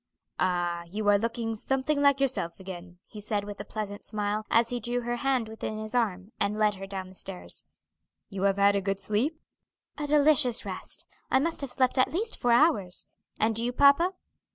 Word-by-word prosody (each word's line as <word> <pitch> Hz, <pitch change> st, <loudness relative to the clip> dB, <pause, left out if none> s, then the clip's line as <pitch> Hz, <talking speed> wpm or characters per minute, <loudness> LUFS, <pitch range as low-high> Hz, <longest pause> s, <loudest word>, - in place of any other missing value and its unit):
"Ah, 175 Hz, -1 st, 0 dB
you 205 Hz, +4 st, -4 dB
are 205 Hz, 0 st, +5 dB
looking 230 Hz, 0 st, -2 dB
something 270 Hz, +6 st, -1 dB
like 280 Hz, -1 st, +4 dB
yourself 260 Hz, -12 st, 0 dB
again," 180 Hz, -2 st, -9 dB
he 210 Hz, -, -10 dB
said, 205 Hz, 0 st, -1 dB
with 205 Hz, 0 st, -8 dB
a -, -, -4 dB
pleasant 205 Hz, -1 st, -6 dB
smile, 210 Hz, 0 st, -2 dB
as 230 Hz, 0 st, +3 dB
he 245 Hz, -, -1 dB
drew 240 Hz, +2 st, -2 dB
her 240 Hz, 0 st, -2 dB
hand 260 Hz, -3 st, 0 dB
within 220 Hz, 0 st, -5 dB
his 215 Hz, +1 st, -4 dB
arm, 205 Hz, -5 st, -1 dB
and 200 Hz, +1 st, 0 dB
led 210 Hz, -1 st, +3 dB
her 195 Hz, 0 st, -8 dB
down 190 Hz, -1 st, -5 dB
the 185 Hz, -, -14 dB
stairs. 185 Hz, 0 st, -1 dB, 0.6 s
"You 195 Hz, -2 st, -6 dB
have 195 Hz, -, -1 dB
had 200 Hz, 0 st, +4 dB
a 200 Hz, -, +1 dB
good 195 Hz, 0 st, -2 dB
sleep?" 225 Hz, +11 st, 0 dB, 0.6 s
"A 295 Hz, -, -2 dB
delicious 290 Hz, -4 st, +4 dB
rest. -, -, -6 dB, 0.2 s
I -, -, +4 dB
must 325 Hz, +4 st, 0 dB
have 275 Hz, -, -2 dB
slept 255 Hz, +1 st, +1 dB
at 255 Hz, -, +3 dB
least 435 Hz, +7 st, -1 dB
four 245 Hz, -, 0 dB
hours. 235 Hz, -, +3 dB, 0.3 s
And 220 Hz, +1 st, +2 dB
you, 240 Hz, +1 st, 0 dB
papa?" 280 Hz, +8 st, +5 dB
220 Hz, 200 wpm, -28 LUFS, 200-260 Hz, 0.6 s, are